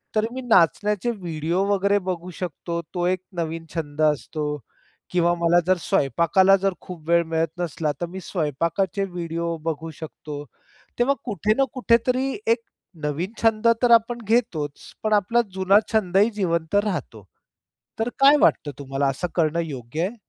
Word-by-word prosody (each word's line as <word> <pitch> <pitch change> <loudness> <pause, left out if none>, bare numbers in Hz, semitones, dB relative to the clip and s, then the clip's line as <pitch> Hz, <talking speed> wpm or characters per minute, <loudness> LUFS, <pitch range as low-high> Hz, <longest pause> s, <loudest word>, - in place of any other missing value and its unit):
तर 215 0 +3
मी 260 - -4
नाचण्याचे 210 +1 +2
व्हिडिओ 170 -2 -2
वगैरे 200 +1 +2
बघू 180 0 -4
शकतो, 170 -1 -4
तो 175 -1 -1
एक 185 0 0 0.2
नवीन 165 0 -3
छंद 150 -2 -4
असतो 150 0 0 0.7
किंवा 175 -1 +3
मला 170 +1 +3
जर 185 - +4
स्वयंपाकाला 170 +8 +3
जर 195 -1 +1
खूप 165 -4 -10
वेळ 170 0 +5
मिळत 160 0 0
नसला, 155 -3 -1
तर 175 - +1
मी 190 +2 -7
स्वयंपाकाचे 170 +4 -1
व्हिडिओ 170 -2 -3
बघू 165 0 -3
शकतो. 150 -2 -8 0.6
तेव्हा 275 +3 +3
कुठे 210 -2 +1
ना 275 - +4
कुठेतरी 255 +2 +2 0.2
एक 230 +1 +3 0.4
नवीन 155 +7 -2
छंद 225 0 +3 0.2
तर 240 - +4
आपण 230 +1 +4
घेतोच, 160 - -1
पण 215 0 +1
आपला 210 +4 +3
जुना 190 +2 +4
छंदही 200 +1 +3
जिवंत 170 -3 -1
राहतो. 140 - -4 0.8
तर 225 +2 0
काय 280 +2 +7
वाटतं 145 - +3
तुम्हाला 135 0 -1
असं 135 +7 -2
करणं 165 0 +1
योग्य 135 0 -5
आहे? 230 - -9
175 Hz, 150 wpm, -23 LUFS, 160-210 Hz, 0.8 s, काय